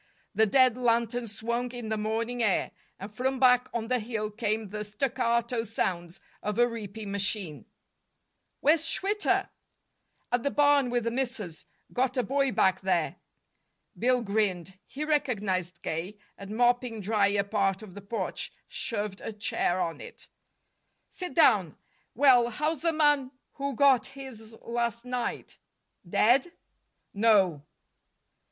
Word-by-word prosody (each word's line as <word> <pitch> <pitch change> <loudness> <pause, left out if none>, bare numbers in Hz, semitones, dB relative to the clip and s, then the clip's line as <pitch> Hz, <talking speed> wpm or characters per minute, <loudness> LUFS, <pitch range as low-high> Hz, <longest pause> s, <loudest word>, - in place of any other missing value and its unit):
The 220 +2 +4
dead 255 +2 +4
lanterns 235 -2 0
swung 235 +2 -2
in 240 -3 -6
the 220 - 0
morning 225 +3 -2
air, 210 -5 +2 0.3
and 200 +2 -8
from 260 +3 -1
back 250 -1 +5
on 225 -1 -3
the 250 +1 +1
hill 215 -1 -3
came 215 -1 -2
the 210 +1 -4
staccato 235 +1 0
sounds 180 -6 -3 0.2
of 210 -1 -3
a 240 0 +5
reaping 215 -3 -6
machine. 195 -6 -2 1.0
"Where's 310 +2 +4
Schwitter?" 410 +5 0 0.8
"At 245 0 +2
the 280 - 0
barn 285 -2 +4
with 240 -1 0
the 230 - -1
missus. 235 - -4 0.3
Got 255 +1 0
a 250 - +2
boy 275 +4 +1
back 190 -4 +2
there." 190 0 0 0.8
Bill 250 0 +2
grinned. 195 -4 -1
He 300 +3 -5
recognized 200 - -1
K., 175 +6 -4 0.2
and, 200 +2 -7
mopping 245 -1 +2
dry 205 0 +2
a 200 0 +1
part 200 -1 0
of 200 -4 -11
the 205 - -9
porch, 200 +4 -3 0.2
shoved 210 -4 -3
a - - -5
chair 205 -3 -1
on 170 -2 -2
it. - - -11 0.8
"Sit 360 -1 -7
down. 200 - +4 0.4
Well, 250 -2 +5
how's 305 +5 -2
the 335 0 +2
man 295 -4 +3 0.2
who 280 -1 -3
got 265 -3 +4
his 260 -5 -10
last 235 0 -2
night? 250 -1 -4 0.5
Dead?" 255 - +3 0.6
"No." 200 -7 +3
230 Hz, 140 wpm, -28 LUFS, 205-255 Hz, 1.0 s, back